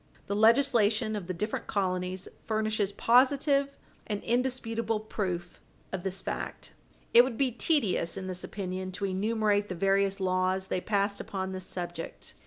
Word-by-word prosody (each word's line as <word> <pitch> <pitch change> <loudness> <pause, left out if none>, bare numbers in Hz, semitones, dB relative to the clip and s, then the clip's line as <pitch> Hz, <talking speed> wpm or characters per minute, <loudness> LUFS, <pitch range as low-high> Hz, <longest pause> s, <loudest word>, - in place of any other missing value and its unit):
The 200 - -2
legislation 220 -1 +4
of 195 -4 -5
the 185 - -2
different 210 +6 -3
colonies 185 -2 -1 0.2
furnishes 215 -2 0
positive 275 +5 +3 0.3
and 205 -2 -3
indisputable 230 -3 0
proof 185 -5 -4 0.3
of 190 - -3
this 190 0 -4
fact. - - -5 0.4
It 240 - +10
would 250 -3 -3
be 270 -2 +2
tedious, 220 - +1
in 190 - -4
this 185 -1 -4
opinion, 185 -1 -4
to 200 - -2
enumerate 205 +1 +1
the 185 - -3
various 195 +2 +2
laws 185 0 0
they 180 - 0
passed 200 0 0
upon 190 -1 -4
this 185 -1 -5
subject. 175 -2 -6
200 Hz, 150 wpm, -29 LUFS, 185-225 Hz, 0.4 s, It